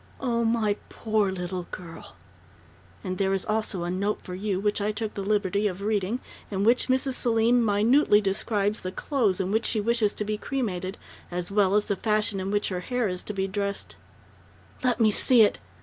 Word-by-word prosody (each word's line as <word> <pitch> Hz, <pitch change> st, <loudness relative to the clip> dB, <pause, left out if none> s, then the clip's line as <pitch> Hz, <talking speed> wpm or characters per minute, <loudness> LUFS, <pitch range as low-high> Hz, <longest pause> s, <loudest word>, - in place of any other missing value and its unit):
"Oh, 235 Hz, -3 st, 0 dB
my 225 Hz, -3 st, +1 dB
poor 215 Hz, -3 st, 0 dB
little 180 Hz, -1 st, -4 dB
girl 170 Hz, -2 st, -10 dB, 0.4 s
" -, -, -27 dB
"And 185 Hz, -2 st, -4 dB
there 195 Hz, -1 st, +2 dB
is 195 Hz, -, -1 dB
also 215 Hz, -4 st, -1 dB
a 175 Hz, -, -2 dB
note 200 Hz, +3 st, -1 dB
for 180 Hz, -, -7 dB
you, 190 Hz, 0 st, -2 dB
which 205 Hz, +1 st, 0 dB
I 210 Hz, +1 st, +1 dB
took 215 Hz, 0 st, -4 dB
the 200 Hz, -, -4 dB
liberty 205 Hz, 0 st, +1 dB
of 190 Hz, 0 st, -5 dB
reading, 210 Hz, +2 st, 0 dB, 0.3 s
in 195 Hz, -1 st, -1 dB
which 235 Hz, +4 st, +3 dB
Mrs. 260 Hz, +1 st, +1 dB
Selim 235 Hz, 0 st, +3 dB
minutely 215 Hz, +2 st, +4 dB
describes 205 Hz, +1 st, 0 dB
the 185 Hz, -, -4 dB
clothes 220 Hz, -4 st, 0 dB
in 190 Hz, 0 st, -1 dB
which 220 Hz, +2 st, +1 dB
she 220 Hz, -, +1 dB
wishes 220 Hz, -1 st, +1 dB
to 210 Hz, -, -2 dB
be 210 Hz, 0 st, -2 dB
cremated, 195 Hz, -9 st, -3 dB, 0.3 s
as 180 Hz, +1 st, -4 dB
well 200 Hz, -1 st, +3 dB
as 210 Hz, -, +3 dB
the 200 Hz, -, 0 dB
fashion 210 Hz, 0 st, 0 dB
in 190 Hz, +1 st, -3 dB
which 205 Hz, +1 st, 0 dB
her 185 Hz, -2 st, -2 dB
hair 245 Hz, +5 st, -1 dB
is 180 Hz, -1 st, -3 dB
to 210 Hz, -, -6 dB
be 190 Hz, -1 st, -1 dB
dressed 200 Hz, +1 st, -4 dB, 0.4 s
" -, -, -26 dB
"Let 250 Hz, -2 st, +2 dB
me 220 Hz, -2 st, +5 dB
see 235 Hz, +2 st, +5 dB
it!" 205 Hz, -, +2 dB
205 Hz, 205 wpm, -26 LUFS, 190-225 Hz, 0.4 s, me